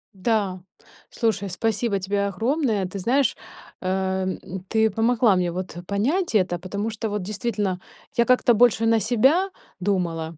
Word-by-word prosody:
Да, 195 Hz, -3 st, 0 dB, 0.5 s
слушай, 215 Hz, -4 st, -1 dB
спасибо 220 Hz, +1 st, -1 dB
тебе 200 Hz, +1 st, -1 dB
огромное. 225 Hz, -, 0 dB
Ты 190 Hz, +2 st, -6 dB
знаешь, 255 Hz, +6 st, +2 dB, 0.5 s
эм, 190 Hz, 0 st, -1 dB, 0.3 s
ты 220 Hz, 0 st, +3 dB
помогла 225 Hz, 0 st, +3 dB
мне 180 Hz, -1 st, 0 dB
вот 180 Hz, -1 st, -5 dB
понять 250 Hz, -, 0 dB
это. 180 Hz, -3 st, +2 dB
Потому 200 Hz, +5 st, -4 dB
что, 220 Hz, 0 st, -4 dB
вот 205 Hz, -1 st, -2 dB
действительно, 205 Hz, -2 st, -2 dB, 0.3 s
я 235 Hz, -, +4 dB
как-то 250 Hz, -1 st, +4 dB
больше 230 Hz, 0 st, +4 dB
на 225 Hz, 0 st, +4 dB
себя 265 Hz, -, +3 dB, 0.3 s
думала. 170 Hz, -4 st, -1 dB
205 Hz, 140 wpm, -24 LUFS, 190-230 Hz, 0.5 s, я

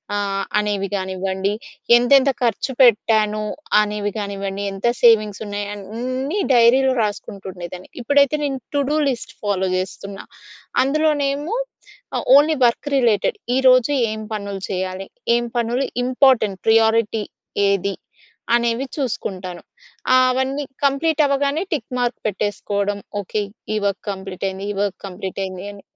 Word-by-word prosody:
ఆహ్, 195 Hz, -1 st, -1 dB, 0.2 s
అనేవి 200 Hz, -2 st, -1 dB
కానివ్వండి. 190 Hz, +1 st, -2 dB, 0.4 s
ఎంతెంత 270 Hz, +3 st, +5 dB
ఖర్చు 235 Hz, +3 st, 0 dB
పెట్టాను 215 Hz, -2 st, +4 dB, 0.4 s
అనేవి 210 Hz, 0 st, -2 dB
కానివ్వండి. 200 Hz, 0 st, -4 dB
ఎంత 195 Hz, +5 st, -2 dB, 0.2 s
సేవింగ్స్ 215 Hz, -3 st, +4 dB
ఉన్నాయి 205 Hz, 0 st, -4 dB
అన్నీ 255 Hz, -, -3 dB
డైరీలో 255 Hz, +3 st, +5 dB
రాసుకుంటుండేదాన్ని. 190 Hz, -3 st, -6 dB
ఇప్పుడైతే 285 Hz, +2 st, +3 dB
నేను 270 Hz, -2 st, -2 dB, 0.2 s
టు 285 Hz, -, +3 dB
డు 305 Hz, -, +2 dB
లిస్ట్ 245 Hz, -3 st, -5 dB
ఫాలో 190 Hz, -2 st, 0 dB
జేస్తున్నా. 195 Hz, +1 st, -6 dB, 0.6 s
అందులోనేమో 295 Hz, -, 0 dB, 0.6 s
ఆహ్, -, -, -2 dB
ఓన్లీ 305 Hz, +1 st, +3 dB
వర్క్ 235 Hz, +5 st, -2 dB
రిలేటెడ్. 230 Hz, -6 st, +2 dB, 0.2 s
ఈరోజు 255 Hz, +1 st, +5 dB, 0.2 s
ఏం 220 Hz, -, -4 dB, 0.2 s
పనులు 200 Hz, -2 st, -5 dB
చేయాలి. 185 Hz, 0 st, -3 dB, 0.3 s
ఏం 240 Hz, -, -1 dB
పనులు 240 Hz, +3 st, 0 dB, 0.2 s
ఇంపార్టెంట్, 250 Hz, -6 st, +3 dB
ప్రియారిటీ 225 Hz, -1 st, +3 dB, 0.5 s
ఏది, 200 Hz, 0 st, 0 dB, 0.6 s
అనేవి 235 Hz, +2 st, 0 dB
చూసుకుంటాను. 185 Hz, -, -4 dB, 0.5 s
ఆహ్, 255 Hz, 0 st, +6 dB
ఆవన్నీ 265 Hz, +3 st, -1 dB, 0.2 s
కంప్లీట్ 305 Hz, +3 st, +2 dB
అవ్వగానే, 280 Hz, +2 st, +1 dB
టిక్ 260 Hz, -7 st, -3 dB
మార్క్ 245 Hz, 0 st, -1 dB
పెట్టేసుకోవడం. 205 Hz, 0 st, -2 dB, 0.2 s
ఓకే, 205 Hz, +2 st, -2 dB, 0.3 s
ఈ -, -, +1 dB
వర్క్ 200 Hz, 0 st, -3 dB
కంప్లీట్ 190 Hz, -1 st, -6 dB
అయింది. 190 Hz, +1 st, -6 dB
ఈ -, -, -9 dB
వర్క్ 200 Hz, -2 st, -2 dB
కంప్లీట్ 190 Hz, +1 st, -6 dB
అయింది 185 Hz, +1 st, -7 dB
అని. 200 Hz, -1 st, -13 dB
215 Hz, 125 wpm, -21 LUFS, 195-260 Hz, 0.6 s, ఆహ్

